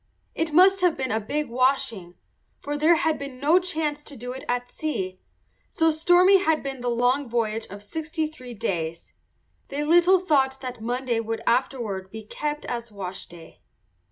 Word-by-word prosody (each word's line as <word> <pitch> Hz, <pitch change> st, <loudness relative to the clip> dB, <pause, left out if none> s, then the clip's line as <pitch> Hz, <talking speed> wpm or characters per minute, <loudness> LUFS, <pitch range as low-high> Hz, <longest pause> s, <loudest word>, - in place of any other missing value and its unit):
It 325 Hz, -1 st, -2 dB
must 380 Hz, +4 st, +6 dB
have 355 Hz, -3 st, +3 dB
been 260 Hz, -1 st, -2 dB
a 220 Hz, -, +1 dB
big 295 Hz, +8 st, -2 dB
washing, 245 Hz, -8 st, 0 dB, 0.4 s
for 290 Hz, -, -4 dB
there 310 Hz, +4 st, +4 dB
had 320 Hz, -2 st, 0 dB
been 275 Hz, -2 st, -7 dB
no 310 Hz, +6 st, +4 dB
chance 310 Hz, -5 st, -2 dB
to 285 Hz, -, -9 dB
do 245 Hz, 0 st, -6 dB
it 260 Hz, +1 st, -7 dB
at 245 Hz, 0 st, -1 dB
sea, 190 Hz, -11 st, -4 dB, 0.5 s
so 325 Hz, 0 st, +2 dB
stormy 355 Hz, +5 st, +5 dB
had 320 Hz, -4 st, +1 dB
been 270 Hz, -2 st, -5 dB
the 245 Hz, -, -1 dB
long 245 Hz, +3 st, +1 dB
voyage 225 Hz, -1 st, -1 dB
of 200 Hz, +1 st, -9 dB
sixty 320 Hz, -, -3 dB
three 255 Hz, -6 st, -9 dB
days. 170 Hz, -7 st, -3 dB, 0.5 s
They 285 Hz, +2 st, -3 dB
little 350 Hz, +4 st, +5 dB
thought 270 Hz, -7 st, +1 dB
that 250 Hz, -4 st, -6 dB
Monday 245 Hz, 0 st, -1 dB
would 225 Hz, 0 st, -4 dB
afterward 230 Hz, -6 st, 0 dB
be 220 Hz, +2 st, -8 dB
kept 295 Hz, +7 st, -4 dB
as 235 Hz, -2 st, -5 dB
washday. 180 Hz, -4 st, -8 dB
265 Hz, 170 wpm, -25 LUFS, 225-310 Hz, 0.5 s, must